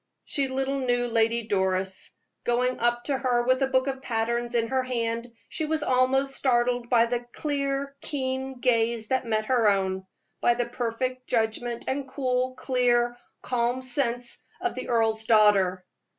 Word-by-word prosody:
She 275 -2 0
little 270 +1 -1
knew 245 -2 +1
Lady 230 0 +2
Doris. 190 -2 -1 0.3
Going 250 +1 +1
up 240 0 +1
to 275 -1 -1
her 245 -2 +1
with 255 +2 +2
a 270 - +3
book 260 -1 +2
of 270 -1 -3
patterns 235 0 -1
in 230 -1 +1
her 265 0 +1
hand, 235 -1 -2 0.2
she 315 - -3
was 310 0 -1
almost 265 +1 +2
startled 245 -2 +1
by 235 -2 +5
the 240 +1 -1
clear, 280 -1 -2
keen 265 -2 -3
gaze 230 -2 +1
that 260 -2 0
met 215 -1 0
her 235 -3 +3
own 190 -1 0 0.3
by 240 - +4
the 245 0 0
perfect 250 +2 -3
judgment 230 +1 -1
and 270 +1 -2
cool, 255 -1 -1
clear, 240 -2 +1 0.3
calm 245 +1 0
sense 245 -2 -1 0.2
of 365 0 -1
the 255 - -6
earl's 225 -2 +1
daughter. 200 -5 +4
245 Hz, 160 wpm, -26 LUFS, 230-260 Hz, 0.3 s, by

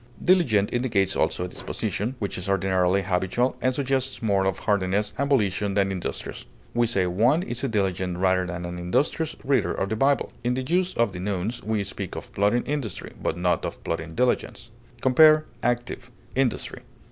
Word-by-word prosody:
Diligent 125 - +3
indicates 110 -6 +1
also 90 - 0
a - - -4
disposition, 110 +6 -3
which 100 -5 -3
is 90 +1 -4
ordinarily 95 0 +2
habitual, 95 +7 0
and 130 0 +1
suggests 135 -2 -1
more 100 -3 +2
of 95 -1 0
heartiness 100 +1 0
and 140 +1 -1
volition 105 -6 +1
than 100 -1 +2
industrious. 90 -2 -5 0.3
We 120 0 +2
say 100 -5 +1
one 115 - +2
is 120 -7 -3
a - - +2
diligent, 95 -5 -1
rather 95 0 +2
than 90 0 -5
an 90 0 -5
industrious, 145 - 0
reader 130 -4 +2
of 95 - -2
the 110 - -1
Bible. 135 +4 +1
In 125 +1 +1
the 130 - -2
use 180 +6 0
of 115 -3 +2
the 90 - -7
nouns, 100 +4 -2
we 110 -2 -1
speak - - -6
of - - -8
plodding 105 +5 +2
industry, 140 -9 -4
but - - -1
not 90 0 +1
of - - -5
plodding 80 0 -4
diligence. 125 -1 0 0.3
Compare 155 +4 +6 0.2
ACTIVE; 120 +1 -2 0.3
INDUSTRY. 130 -2 -1
105 Hz, 180 wpm, -25 LUFS, 95-130 Hz, 0.3 s, Compare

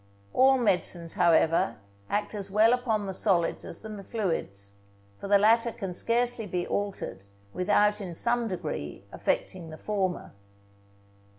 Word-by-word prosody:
All 265 +1 +5
medicines, 180 -7 0
however, 165 -7 +3 0.3
act 205 +2 -1
as 200 -2 -5
well 215 +4 +5
upon 225 -4 0
the 190 - -4
solids 180 -3 +1
as 165 - -6
the 210 -2 -7
fluids; 100 - -3 0.5
for - - -6
the 200 0 +6
latter 230 +3 +4
can 195 -5 -5
scarcely 235 +2 0
be 175 -1 -2
altered 200 - -3 0.3
without 210 +3 +2
in 180 -4 -6
some 235 +4 +1
degree 160 - -5
affecting 175 -3 -2
the 155 - -9
former. 190 -3 -2
200 Hz, 135 wpm, -28 LUFS, 175-220 Hz, 0.5 s, the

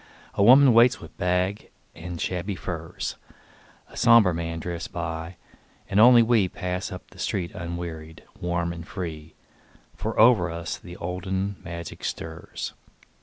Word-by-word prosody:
A - - -1
woman 130 +4 +8
waits 120 +1 +5
with - - -12
bag 90 +2 0 0.2
and 85 0 -7
shabby 95 +4 -2
furs, 85 -2 -5 0.7
A - - -16
somber 115 -6 +6
man 85 0 -3
drifts 85 +3 -5
by, 85 -3 -5 0.5
and 100 - +1
only 120 +1 +8
we 115 -4 +3
Pass 90 +4 -4
up 90 -1 -9
the - - -16
street 90 -3 -2
unwearied, 85 -2 -6 0.2
warm 85 -1 -1
and 85 0 -9
free, 80 -5 -6 0.6
For 110 +1 -3
over 110 -6 +6
us 85 0 -5
the 90 0 -11
olden 95 +3 -3
magic 85 -1 -7
stirs. 80 +1 -5
90 Hz, 140 wpm, -25 LUFS, 85-100 Hz, 0.7 s, woman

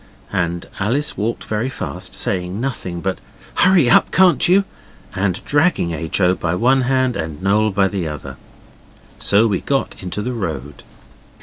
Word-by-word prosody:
And 85 -3 -1
Alice 125 +9 0
walked 115 +3 -2
very 110 +4 -2
fast, - - -4
saying 90 +1 -1
nothing 95 -9 -4
but 95 0 -2 0.3
'Hurry 180 -7 +4
up, 120 - +4
can't 185 -1 +5
you!' 195 +2 +5 0.5
and 95 -1 -2
dragging 145 - +2
H. 80 +2 -2
O. 90 -1 +4
by 85 -1 -2
one 130 +6 +3
hand 130 -2 +1
and 80 -2 -4
Noel 105 +3 +3
by 100 -1 +2
the 95 -3 -3
other. 70 -3 -7 0.8
So 100 +3 +4
we 100 -5 0
got 135 -1 -1
into 95 +3 -4
the 125 +2 -3
road. 80 - -5
100 Hz, 160 wpm, -19 LUFS, 90-130 Hz, 0.8 s, can't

